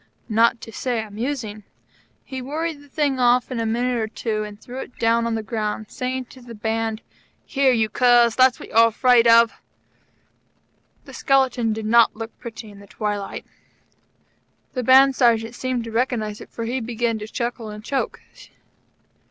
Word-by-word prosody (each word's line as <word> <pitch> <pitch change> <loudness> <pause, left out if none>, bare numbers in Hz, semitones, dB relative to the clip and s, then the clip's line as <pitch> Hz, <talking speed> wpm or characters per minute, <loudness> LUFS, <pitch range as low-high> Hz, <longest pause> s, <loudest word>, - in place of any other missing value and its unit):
Not 230 +2 +3
to 225 - -9
say 245 +1 -2
amusing. 220 0 -5 0.6
He 265 -1 -7
worried 305 +3 -4
the 285 - -18
thing 280 -2 0
off 245 0 +3
in 250 - -2
a 225 - -1
minute 245 +2 0
or 220 - -1
two, 215 -1 -3
and 210 -1 -9
threw 250 +3 -8
it 255 - -9
down 230 0 +2
on 230 - -1
the 220 - -3
ground, 215 0 -4
saying 255 0 -3
to 260 - -14
the 240 -1 -11
Band: 225 +1 -2 0.4
"Here, 275 -2 +2
you 225 -3 +2
curs, 240 0 +4
that's 255 -1 +4
what - - -10
you're 230 +1 +5
afraid 235 +1 +4
of." 230 0 +5 1.4
The - - -12
skeleton 260 -4 +1
did 215 0 -4
not 230 +1 +4
look 225 +1 -7
pretty 225 -2 -9
in 200 - -14
the 200 - -14
twilight. 205 -1 -4 1.3
The 255 - -2
Band 265 +2 +6
Sergeant 230 -3 +2
seemed 255 -1 -3
to 230 - -8
recognize 225 -3 -1
it, - - -11
for 230 - -6
he 250 +3 -2
began 230 -1 -2
to 210 - -7
chuckle 235 -1 -4
and 210 0 -9
choke. 270 +2 -2
235 Hz, 175 wpm, -22 LUFS, 220-255 Hz, 1.4 s, Band